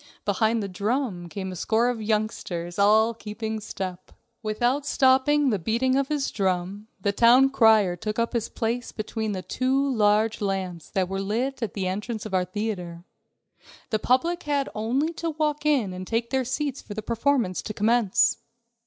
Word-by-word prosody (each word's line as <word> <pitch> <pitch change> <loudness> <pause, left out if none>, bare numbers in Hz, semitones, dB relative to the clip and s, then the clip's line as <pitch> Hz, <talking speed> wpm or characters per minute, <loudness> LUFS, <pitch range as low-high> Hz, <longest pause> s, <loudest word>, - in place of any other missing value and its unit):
Behind 220 +2 +1
the - - -3
drum 200 -2 -2
came 190 0 -5
a - - -7
score 225 +7 +1
of 245 -2 -1
youngsters, 210 -5 -2
all 220 +3 +5
keeping 220 0 -5
step. 185 -3 -6 0.3
Without 240 +6 0
stopping 270 +1 +3
the 205 - 0
beating 235 +8 +1
of 275 0 +1
his 290 -2 -1
drum, 190 +1 -2
the 200 +1 0
town 245 +6 +5
crier 220 -7 +5
took 210 +4 -4
up 230 0 0
his 230 -2 -1
place 235 +1 -2
between 215 0 -3
the 185 -1 -4
two 270 +2 0
large 215 0 +2
lamps 190 -4 -3
that 190 -2 0
were 195 +1 -3
lit 240 +7 -2
at 225 -5 -3
the 195 -2 -2
entrance 210 +4 -3
of 215 - -7
our 185 -1 +2
theater. 180 -4 -4 0.9
The 215 - +1
public 335 +11 +1
had 285 -2 -1
only 255 +10 0
to 335 0 -3
walk 300 -1 -1
in 250 -11 +2
and 185 0 -7
take 230 +1 -1
their 265 -1 +1
seats 275 +2 -2
for 205 - -9
the 215 - -4
performance 235 -4 0
to - - -6
commence. 215 -1 +2
220 Hz, 175 wpm, -25 LUFS, 195-255 Hz, 0.9 s, all